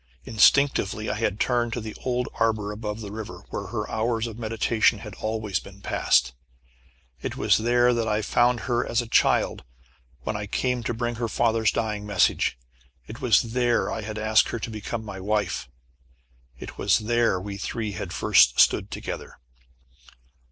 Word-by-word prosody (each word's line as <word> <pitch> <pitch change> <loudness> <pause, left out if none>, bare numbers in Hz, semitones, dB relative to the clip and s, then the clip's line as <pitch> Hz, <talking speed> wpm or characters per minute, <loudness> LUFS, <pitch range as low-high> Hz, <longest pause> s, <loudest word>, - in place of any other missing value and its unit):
Instinctively 110 -2 +3
I - - -1
had 110 -2 -1
turned 120 -2 +1
to - - -2
the 110 -1 -7
old 125 -1 -1
arbor 110 -2 0
above 105 +1 -5
the 100 -2 -7
river, 100 -4 -7
where 100 - -4
her 105 +1 -3
hours 115 +1 -1
of 115 -1 -7
meditation 115 0 +1
had - - -9
always 110 -3 -2
been 100 0 -14
passed. 60 -9 +2 0.9
It - - -4
was - - +3
there 120 +2 +3
I 120 -1 +1
had 105 0 -1
found 120 -1 +2
her 120 +4 0
as 120 +1 0
a - - -10
child, - - +2 0.6
when 110 - -3
I 105 -1 -4
came 125 +3 -1
to 120 - -1
bring 120 0 -2
her 115 - 0
father's 115 -1 +2
dying 105 -2 -2
message. 95 -10 +2 0.5
It 115 - -10
was 115 -5 +4
there 120 -1 +1
I - - -3
had 110 0 -6
asked 110 0 +3
her - - -3
to 115 +1 -5
become 110 +1 -5
my 95 -3 -7
wife. 105 - -1 0.9
It - - -10
was 100 -1 +3
there 115 -3 +1
we 100 +1 -6
three 110 +1 -3
had 90 - -6
first - - +4
stood - - +4
together. - - -6
110 Hz, 175 wpm, -25 LUFS, 105-120 Hz, 0.9 s, was